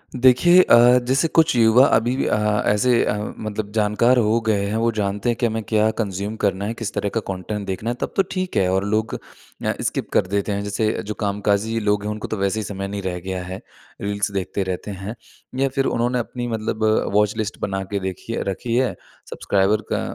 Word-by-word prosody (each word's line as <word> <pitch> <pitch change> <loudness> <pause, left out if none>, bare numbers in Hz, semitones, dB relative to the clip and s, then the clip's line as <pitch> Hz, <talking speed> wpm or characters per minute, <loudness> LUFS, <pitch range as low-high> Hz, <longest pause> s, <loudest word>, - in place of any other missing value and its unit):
देखिए 130 +9 +6
अ, 120 -4 +6
जैसे 135 +5 +2
कुछ 160 -3 +3
युवा 115 +3 +6
अभी 120 +3 +1
भी - - 0
अ, - - +1 0.3
ऐसे 115 +4 +3
अ, - - 0 0.3
मतलब 110 -1 -4
जानकार 110 +4 +3
हो 115 0 +3
गए 100 -2 +2
हैं 110 - -1
वो 115 +1 +2
जानते 105 +1 -1
हैं 120 - +1
कि 125 - +2
हमें 110 -1 -1
क्या 110 0 +2
कंज़्यूम 100 +1 -3
करना 100 0 +1
है 110 - -2
किस 115 -3 -5
तरह 100 - -1
का - - +3
कंटेंट 100 +2 -4
देखना 100 +4 -3
है 120 - -1
तब - - -3
तो 195 - +4
ठीक 185 -1 -2
है 95 - +3
और 95 +1 +1
लोग 110 +1 -1
अ, - - -6
स्किप - - -2
कर - - +3
देते 100 +2 -1
हैं। 100 0 -2
जैसे 105 +2 0
जो 105 - -4
कामकाजी 105 +2 0
लोग 105 -1 0
हैं 105 - -2
उनको 105 - -5
तो 110 - -3
वैसे 100 +3 0
ही - - -3
समय 100 -1 -5
नहीं 100 0 -4
रह 90 -2 -3
गया 95 0 -4
है 95 +1 -7 0.4
रील्स 100 0 -1
देखते 100 0 -2
रहते 95 +2 -4
हैं 100 +3 -6 0.4
या 135 - +3
फ़िर 135 0 +1
उन्होंने 120 +1 0
अपनी 120 +1 -4
मतलब 110 -1 -3 0.3
वॉच 105 +1 +2
लिस्ट 110 -1 -3
बना 95 -1 -2
के 100 - 0
देखी 95 +4 -5
है - - -2
रखी 115 +5 -3
है 125 -7 +1 0.3
सब्सक्राइबर 100 +2 +1
का - - 0
105 Hz, 220 wpm, -21 LUFS, 100-115 Hz, 0.4 s, देखिए